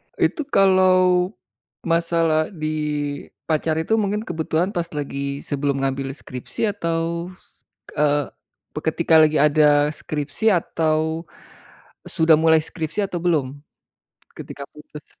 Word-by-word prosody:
Itu 305 -3 0
kalau 185 -3 +4 0.5
masalah 165 -2 +1
di 155 -2 -4 0.8
pacar 155 0 0
itu 220 +8 +1
mungkin 210 +1 -1
kebetulan 170 +1 -1
pas 170 -1 -1
lagi 140 -1 -4
sebelum 140 -1 -1
ngambil 135 0 -2
skripsi 155 - -4
atau, 170 -2 -2
s - - -24 0.4
eee, 145 -1 +2 0.5
pe 150 - -4
ketika 160 0 +2
lagi 155 0 +4
ada 150 0 +4
skripsi 150 +7 -4
atau 160 -1 -1 0.8
sudah 160 -1 +4
mulai 160 -1 +5
skripsi 165 +5 -3
atau 175 -3 -4
belum, 145 -6 0 0.7
ketika 140 - -9
putus? 150 0 -14
160 Hz, 115 wpm, -22 LUFS, 150-175 Hz, 0.8 s, mulai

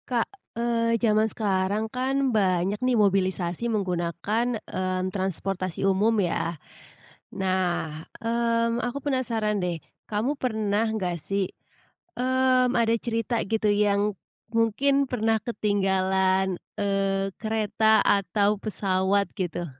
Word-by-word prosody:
Kak, 240 -3 +1 0.3
eee, 230 -1 +1
zaman 215 -1 +2
sekarang 200 0 0
kan 265 0 0
banyak 195 0 +1
nih 250 -1 +2
mobilisasi 190 0 +1
menggunakan, 200 +4 -1
mmm, 185 0 -2
transportasi 190 -1 -2
umum 200 +4 +3
ya. 170 -3 -1 0.8
Nah, 180 -5 -1 0.2
mmm, 230 0 +1
aku 245 +3 -3
penasaran 230 -6 0
deh, 175 -3 -2 0.2
kamu 235 +8 -1
pernah 220 -3 0
gak 180 -5 -2
sih, 195 +4 -2 0.7
mmm, 255 0 +2
ada 230 -1 +3
cerita 230 0 -1
gitu 215 0 0
yang, 205 0 +2 0.4
mungkin 270 +5 +2
pernah 225 -2 +1
ketinggalan, 190 -3 +1 0.2
eee, 195 -1 0
kereta 220 -1 +2
atau 200 +1 +2
pesawat 195 -1 +1
gitu? 175 -3 -3
210 Hz, 105 wpm, -26 LUFS, 190-230 Hz, 0.8 s, umum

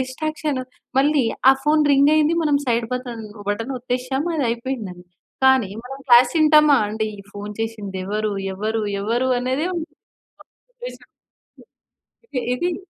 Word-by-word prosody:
Distraction 295 +1 -3 0.4
మళ్ళీ 285 -2 +3 0.3
ఆ - - +7
phone 305 0 +4
రింగయింది 300 +3 +4
మనం 295 -2 +2
సైడ్ 235 -1 +1
బతన్ 245 -3 -5 0.2
బటన్ 225 +6 -2
ఒత్తేసాము 255 +5 -2
అది 280 -5 +1
అయిపోయిందం‌‌డి. 230 -7 -5 0.4
కానీ 260 -7 +4
మనం 270 +2 -8
క్లాస్ 245 0 +7
ఇంటామా 300 -2 +6
అండి? 220 +1 -2
ఈ - - -13
ఫోన్ 205 +1 -7
చేసింది 210 -4 -4
ఎవరు, 210 +1 -1 0.2
ఎవరు, 215 +2 -2 0.2
ఎవరు, 240 +5 0
అనే‌దే 260 +6 -1
ఉంటుంది 325 0 -7 0.6
కాన్సన్‌ట్రేషన్ - - -12 1.3
ఇది - - -5 0.3
ఇది 370 +3 -8
255 Hz, 130 wpm, -21 LUFS, 225-295 Hz, 1.3 s, ఆ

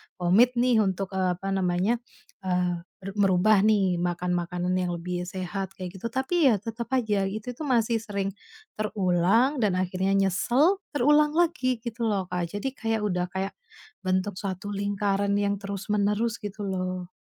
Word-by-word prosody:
komit 205 +8 +4
nih 240 -1 +3
untuk, 195 -2 0
eee, 185 -2 0
apa 195 +2 -4
namanya? 190 +4 +1 0.4
Eee, 180 -2 0 0.2
ber 195 +2 -7
merubah 195 +1 +4
nih 195 -5 +3
makan 175 +1 -1
makanan 180 +1 -1
yang 180 -1 -1
lebih 175 +1 -3
sehat 190 +1 -4
kayak 185 0 -7
gitu, 190 - -9
tapi 290 +5 +1
ya 230 - +4
tetap 230 +1 -5
aja 215 -6 +1
itu 210 +4 -4
tuh 310 - -4
masih 235 -4 +2
sering 200 -3 -3 0.5
terulang 210 - +2
dan 210 -4 +2
akhirnya 185 +1 0
nyesel, 240 - +3 0.2
terulang 295 +2 +4
lagi 260 -8 +1
gitu 235 0 -4
loh 195 -4 -1
Kak 175 -1 -3
jadi 205 - -3
kayak 225 -4 -1
udah 180 -4 0
kayak 190 +1 -2 0.5
bentuk 185 +1 0
suatu 195 0 -4
lingkaran 200 0 0
yang 200 0 +1
terus-menerus 205 +3 -1
gitu 205 0 -6
loh. 185 -2 -3
200 Hz, 155 wpm, -26 LUFS, 185-225 Hz, 0.5 s, komit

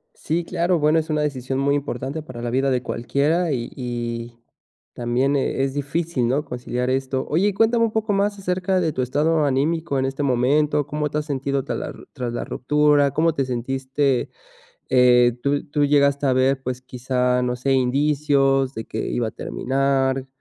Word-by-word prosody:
Sí, 170 +2 -2
claro, 175 0 0
bueno, 155 +2 +3
es 160 0 -5
una 150 -1 +1
decisión 135 -2 -2
muy 140 +1 +2
importante 140 +2 -4
para 125 -5 -9
la 120 - -2
vida 135 +3 +1
de 125 -1 +1
cualquiera 145 +8 0
y 120 -3 -3
y 120 -2 -5 0.6
también, 125 +4 0
eh, 135 0 0
es 135 0 -2
difícil, 145 -2 -1
¿no?, 140 +4 +1
conciliar 125 -1 -3
esto. 130 0 -1
Oye, 195 +6 +2
cuéntame 230 +2 +3
un 220 - -2
poco 220 -2 0
más 200 +1 0
acerca 185 0 0
de 165 -3 0
tu 130 - -1
estado 150 +4 +1
anímico, 145 +2 0
en 130 - 0
este 135 +2 -3
momento, 140 +3 +2
¿cómo 150 0 -2
te 150 - 0
has 150 - -5
sentido 140 -2 -2
tras - - -3
la - - -5 0.2
tras 120 -2 -4
la - - -3
ruptura, 145 0 +2
cómo 165 +1 +2
te 135 - 0
sentiste?,eh, 135 - -2 0.9
¿tú 145 +1 0
llegaste 140 0 +3
a 130 - +3
ver, 130 +1 +2
pues, 130 0 -4
quizá, 125 0 0
no 125 0 -1
sé, 135 +2 0
indicios 135 0 +2
de 110 - -5
que - - -6
iba 120 -2 -1
a - - -6
terminar? 135 +1 -1
140 Hz, 180 wpm, -22 LUFS, 130-150 Hz, 0.9 s, bueno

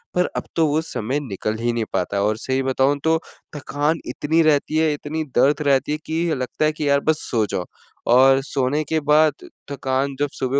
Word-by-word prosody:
पर 180 0 +2
अब - - -2
तो 160 -2 +3
वो 150 +2 +1
समय 125 +6 -1
निकल 110 +1 -3
ही 120 0 0
नहीं 115 -2 -1
पाता 100 +3 -1
है 100 - +1
और 105 +1 +1
सही 130 +3 -1
बताऊँ 135 +2 +1
तो 160 0 +4 0.4
थकान 145 +3 -1
इतनी 155 +6 +1
रहती 155 0 +2
है, 160 -1 +2
इतनी 155 +2 -4
दर्द 145 +5 +3
रहती 140 +1 +2
है - - -1
कि 160 +2 -1
लगता 130 +4 -2
है 155 - +3
कि 150 -1 -2
यार 140 0 +4
बस 155 - +2
सो 110 -2 +2
जाओ 90 - -2 0.5
और 135 +2 +6
सोने 140 +2 -1
के 160 +2 0
बाद 155 0 +5 0.4
थकान 135 0 -1
जब 145 -1 0
सुबह 130 +2 -1
140 Hz, 210 wpm, -21 LUFS, 130-155 Hz, 0.5 s, और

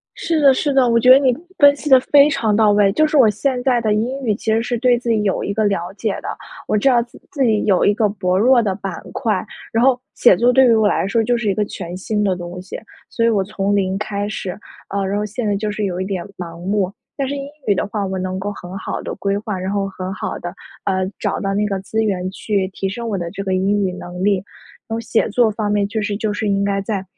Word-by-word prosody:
是 325 -2 -1
的 280 -2 +7
是 280 +2 0
的， 265 -2 +4
我 230 0 +3
觉 250 +2 +2
得 260 - +10
你， 265 -2 +3 0.3
分 285 -1 +7
析 295 - -6
得 265 -2 +8
非 285 +2 +5
常 235 -8 0
到 215 0 +4
位， 205 -1 +4
就 310 +9 +3
是 305 - -1
我 245 -6 +6
现 250 +4 -1
在 250 -2 +2
的 215 -2 +1
英 245 +6 -1
语 215 - +2
其 220 0 -2
实 225 +1 +2
是 245 0 -2
对 245 0 +3
自 240 - -6
己 220 -2 +2
有 195 -2 0
一 - - -2
个 220 - +1
了 185 -3 -1
解 210 0 -1
的， - - -7 0.4
我 - - +1
知 210 +6 +3
道 245 -2 +4
自 235 0 -13
自 280 - -2
己 220 -3 +2
有 195 -3 +3
一 205 - +4
个 215 -1 +2
薄 185 -2 -1
弱 240 +3 +5
的 195 -3 -1
板 195 -1 -5 0.2
块。 225 -5 -1 0.3
然 230 +2 +2
后， 260 -2 +4 0.2
写 215 -7 +5
作 245 +4 +3
对 265 0 +6
于 235 - +5
我 220 -1 +3
来 - - 0
说 225 +3 +1
就 240 +1 +1
是 220 -3 -2
一 195 - +2
个 210 - 0
全 180 -3 -7
新 210 +2 -2
的 190 -2 +2
东 175 +1 -7
西， 185 - -8 0.3
所 230 -1 -1
以 - - +5
我 210 -4 +2
从 200 0 -1
零 190 -1 0
开 205 -1 -3
始， 205 -3 -4 0.4
啊。 200 0 -2
然 195 +1 -1
后 210 - -1
现 215 +2 -4
在 205 - +1
就 210 +1 -2
是 210 0 -3
有 185 -2 -2
一 - - -1
点 190 -3 -3
盲 170 -1 -8
目。 190 0 -1 0.2
但 275 -2 -2
是 285 - -2
英 275 - -5 0.2
语 205 - +3
的 - - -1
话 205 -1 -3
我 190 0 -3
能 185 0 -3
够 205 +2 -3
很 180 -1 -9
好 - - -4
地 - - -5
规 200 0 -1
划， 205 -2 -4
然 185 +1 -3
后 200 -1 0
很 185 -1 -6
好 - - -4
地， 175 - -5 0.4
呃， 190 -1 0
找 - - -1
到 195 -1 -2
那 210 +1 +1
个 200 -2 -2
资 220 +3 -2
源 185 -4 -1
去 200 0 -1
提 195 0 -4
升 235 +5 -5
我 215 -3 -1
的 170 -1 -4
这 195 - -6
个 190 - -2
英 195 +2 +1
语 185 - -3
能 180 0 -6
力， 205 -1 +3 0.5
然 225 - -3
后 - - -3
写 230 0 0
作 225 +1 +3
方 210 -1 -2
面 205 -1 +1
确 220 +2 -3
实 205 0 -2
就 215 0 -1
是 210 0 -2
应 200 0 +1
该 200 0 0
再， 195 -1 -3
210 Hz, 300 characters per minute, -19 LUFS, 195-230 Hz, 0.5 s, 得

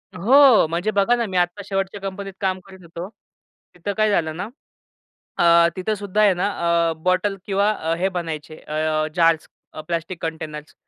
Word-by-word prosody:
हो. 245 - +6
म्हणजे 175 +6 -1
बघा 205 +4 +3
ना 235 -1 -1
मी 190 -3 -3
आता 175 +3 0
शेवटच्या 195 0 -3
कंपनीत 195 0 -6
काम 190 -1 0
करीत 190 -1 -14
होतो. 170 +1 -7 0.7
तिथं 180 +4 -4
काय 215 0 +3
झालं 160 -5 0
ना 190 - -4 1.0
अ, 170 0 +6
तिथं 190 +4 -2
सुद्धा 205 +1 -1
आहे 205 -2 +5
ना 180 +2 -1 0.4
अ, - - -1
बॉटल 185 +2 +1
किंवा 200 0 +1
अ, 165 -6 -2
हे 190 +2 0
बनायचे 160 -4 -5
अ, 155 0 -1
जार्स 165 -2 +3 0.3
अ, 155 - -7
प्लास्टिक 170 +1 -4
कंटेनर्स. 155 -2 -6
185 Hz, 170 wpm, -22 LUFS, 165-200 Hz, 1.0 s, हो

